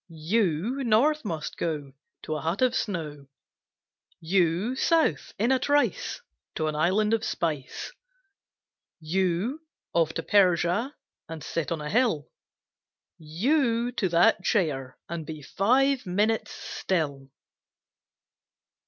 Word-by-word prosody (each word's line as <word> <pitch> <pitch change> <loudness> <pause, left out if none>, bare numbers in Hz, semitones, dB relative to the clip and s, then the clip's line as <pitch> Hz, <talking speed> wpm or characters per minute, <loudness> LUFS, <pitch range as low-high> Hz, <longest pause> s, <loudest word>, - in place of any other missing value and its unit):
You, 220 - +1
north 265 +7 +3
must 160 -6 -4
go 150 -5 -3 0.3
To 155 - -3
a 155 - -3
hut 170 - 0
of 250 -1 +3
snow; 155 - -3 0.9
You, 180 +6 +1
south, 310 - +1
in 230 +5 +2
a 260 - +3
trice, 290 - 0 0.3
To 155 - -1
an 155 - -1
island 195 +8 +2
of 225 - +1
spice; 150 - -3 1.1
You, 185 - -1 0.3
off 165 -2 +2
to - - -3
Persia 195 - +2 0.3
And 160 -2 -7
sit 165 -1 -3
on 165 -2 -2
a 150 - -4
hill, 225 - +1 0.9
You, 235 - +1
to 220 -6 -1
that 175 +6 +4
chair 140 - 0
And 170 -1 -4
be 155 -1 -8
five 255 - +2
minutes' 210 +5 +1
still! 145 -7 -3
185 Hz, 120 wpm, -27 LUFS, 160-235 Hz, 1.1 s, that